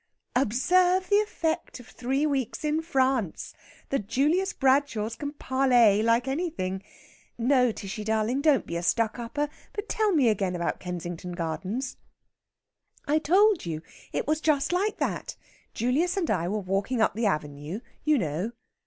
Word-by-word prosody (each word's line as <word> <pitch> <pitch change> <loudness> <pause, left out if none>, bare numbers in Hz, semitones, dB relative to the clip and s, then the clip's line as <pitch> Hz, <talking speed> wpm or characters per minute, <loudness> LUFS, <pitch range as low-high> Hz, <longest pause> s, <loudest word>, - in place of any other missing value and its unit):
"Observe 360 - +3
the 405 - +5
effect 340 -8 -1
of 245 - -12
three 265 +4 -1
weeks 275 -1 -1
in 305 +1 +1
France. 265 - 0 0.4
The 275 - +1
Julius 295 - +1
Bradshaws 260 -5 +1
can 290 +3 -5
parlay 250 -7 +3
like 230 +3 +2
anything! 270 - -2 0.6
No, 250 0 +3
Tishy 210 +1 -6
darling, 220 +5 0
don't 285 -7 +3
be 170 - -5
a - - -3
stuck 225 +6 +1
upper, 290 +6 -2 0.3
but 415 0 -5
tell 435 -2 +1
me 290 -9 +4
again 195 -4 +1
about 170 -1 -2
Kensington 175 0 -5
Gardens." 185 - -3 1.1
"I 300 +2 +2
told 380 - +3
you. 160 -1 -4 0.3
It - - -2
was 310 +1 0
just 305 +1 +2
like 405 +4 0
that. - - -2 0.4
Julius 290 - +1
and 355 -4 0
I 175 -4 0
were 205 +4 -1
walking 200 +5 -1
up 220 - +3
the 225 0 0
avenue 150 +3 -3 0.2
you 305 -1 +3
know...." 180 - -2
250 Hz, 155 wpm, -27 LUFS, 205-305 Hz, 1.1 s, the